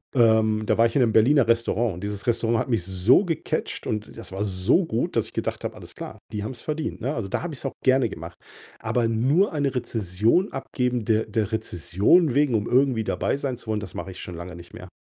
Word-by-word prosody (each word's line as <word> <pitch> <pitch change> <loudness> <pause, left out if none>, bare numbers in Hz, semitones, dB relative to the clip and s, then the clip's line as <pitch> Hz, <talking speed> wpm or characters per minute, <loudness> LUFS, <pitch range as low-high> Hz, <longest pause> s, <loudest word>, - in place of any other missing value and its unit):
Ähm, 110 -2 +4
da - - +2
war 115 - +6
ich 115 - -8
in 140 - +4
'nem 110 -2 +1
Berliner 125 +2 +5
Restaurant. 115 -2 +1
Und 90 - -9
dieses 105 +1 -4
Restaurant 115 -1 +1
hat - - -3
mich 115 -7 +1
so 95 - +4
gecatcht 165 -5 -3
und 105 0 -4
das 115 - -8
war 95 +2 -3
so 100 - +2
gut, 110 - -2
dass - - +2
ich - - -10
gedacht - - -3
habe: - - -4
„Alles - - -11
klar, - - -8 0.2
die 105 -1 -3
haben's 120 +2 -6
verdient“, 155 -3 -3
ne? 130 +5 -1
Also, 115 -7 -3
da - - -2
habe 175 - -4
ich's 135 - -7
auch 135 - -2
gerne 130 -2 +3
gemacht. 85 -2 -8 0.5
Aber 120 -2 0
nur 135 - +2
eine 140 -3 -1
Rezension 115 - +1
abgeben 125 -3 -2
de 110 0 +1
der 110 -2 -1
Rezension 105 - +2
wegen, 140 -3 +2
um 105 0 0
irgendwie 130 -3 +2
dabei 135 - -1
sein 135 -3 -3
zu - - -14
wollen, 110 -1 -1
das 105 -3 -8
mache - - -6
ich 90 - -10
schon 90 - -7
lange 85 +2 -8
nicht 85 0 -13
mehr. 90 - -10
115 Hz, 235 wpm, -24 LUFS, 105-130 Hz, 0.5 s, war